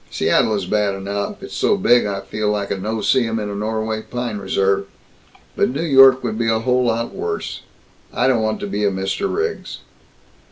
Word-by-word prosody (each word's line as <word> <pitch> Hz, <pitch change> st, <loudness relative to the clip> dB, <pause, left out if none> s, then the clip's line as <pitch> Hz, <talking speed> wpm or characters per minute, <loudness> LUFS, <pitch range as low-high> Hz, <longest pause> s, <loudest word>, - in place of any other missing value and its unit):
Seattle 110 Hz, -, +2 dB
is 100 Hz, -3 st, -2 dB
bad 105 Hz, 0 st, 0 dB
enough 100 Hz, +1 st, -4 dB
it's -, -, -8 dB
so -, -, +2 dB
big 120 Hz, -1 st, +4 dB
that 100 Hz, -1 st, -3 dB
I -, -, -22 dB
feel 110 Hz, -1 st, -2 dB
like 105 Hz, -1 st, -2 dB
a 100 Hz, -, -1 dB
no 110 Hz, +3 st, -3 dB
see 115 Hz, +3 st, +2 dB
um 115 Hz, -, -2 dB
in 105 Hz, -2 st, -3 dB
a -, -, -5 dB
Norway 110 Hz, +1 st, -2 dB
pine 120 Hz, -3 st, -4 dB
reserve. 100 Hz, 0 st, 0 dB, 0.7 s
But -, -, +2 dB
New 140 Hz, +6 st, -3 dB
York 135 Hz, -3 st, +6 dB
would 110 Hz, -2 st, -3 dB
be 115 Hz, -, 0 dB
a 110 Hz, -, +2 dB
lot 120 Hz, -1 st, 0 dB
worse. 425 Hz, 0 st, -4 dB, 0.5 s
I 125 Hz, -, 0 dB
don't 125 Hz, -4 st, +2 dB
want 110 Hz, 0 st, -1 dB
to -, -, -3 dB
be 100 Hz, +1 st, -2 dB
a 100 Hz, -, +3 dB
Mr. 95 Hz, -, -2 dB
Riggs." 430 Hz, +1 st, -3 dB
110 Hz, 205 wpm, -20 LUFS, 100-120 Hz, 0.7 s, York